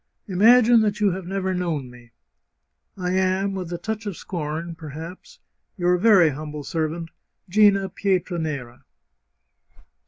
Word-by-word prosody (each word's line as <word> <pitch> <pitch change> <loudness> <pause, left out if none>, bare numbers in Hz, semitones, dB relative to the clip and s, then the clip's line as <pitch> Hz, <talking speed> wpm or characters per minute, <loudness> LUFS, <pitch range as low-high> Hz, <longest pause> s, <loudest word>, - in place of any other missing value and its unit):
Imagine 230 +4 +5
that 210 0 0
you 205 -2 +3
have 180 0 -5
never 190 0 -2
known 160 -8 -3
me. 120 -1 -16 0.9
I 180 -1 -2
am, 190 +1 +1
with 185 -3 -5
a 175 - -3
touch 220 +2 -5
of 195 - -5
scorn, 165 0 -5
perhaps, 165 - -10 0.4
^ - - -25
Your 180 0 +3
very 195 -5 +6
humble 150 +1 -7
servant, 165 +2 -3 0.2
" - - -36
GiNA 195 -1 +4
PlETRANERA." 160 -10 -2
180 Hz, 135 wpm, -23 LUFS, 160-195 Hz, 0.9 s, very